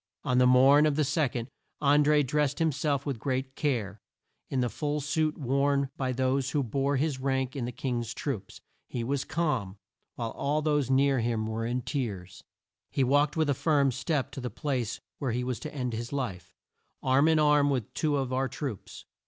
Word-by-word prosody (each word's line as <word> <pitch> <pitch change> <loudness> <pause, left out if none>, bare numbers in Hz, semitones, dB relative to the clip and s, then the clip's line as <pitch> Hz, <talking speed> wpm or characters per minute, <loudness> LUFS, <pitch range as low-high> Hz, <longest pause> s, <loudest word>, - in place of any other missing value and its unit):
On 125 0 +2
the 125 - +5
morn 135 +4 +6
of 150 - +1
the 155 - +2
2d, 135 -5 0 0.3
An 145 0 +4
dré 150 -1 +4
drest 145 +1 0
him 160 -1 +3
self 140 0 -1
with 135 -6 -3
great 130 +1 -2
care, 110 -8 -2 0.5
in 135 - -1
the 125 - +1
full 145 +5 -2
suit 155 +1 0
worn 140 0 +1
by 130 -1 -1
those 130 +1 0
who 145 -1 0
bore 135 +4 0
his 145 -1 0
rank 130 -1 -1
in 130 -4 -2
the 120 - -4
King's 120 -2 -3
troops. 110 -10 -4 0.3
He 120 - -4
was 135 +3 -1
calm, 140 - -1 0.4
while 115 -2 -3
all 150 +2 -1
those 150 -3 +1
near 135 0 +3
him 115 -1 -1
were 110 +1 -2
in 125 +1 -2
tears. 105 - -4 0.5
He 135 - +1
walked 145 +4 +2
with 160 -1 +2
a 140 - +3
firm 140 -2 +2
step 140 0 -1
to 135 0 -7
the 125 - -3
place 130 -7 -2 0.2
where 130 -5 -1
he 125 +1 -1
was 125 -1 -3
to 155 - -6
end 125 -4 -3
his 115 +2 -4
life, 105 -11 -4 0.5
arm 135 +3 +4
in 160 -1 +4
arm 150 -1 +4
with 130 -7 -2
two 150 -2 +1
of 130 -2 -2
our 130 +1 +1
troops. 130 -4 -6
135 Hz, 200 wpm, -28 LUFS, 125-145 Hz, 0.5 s, morn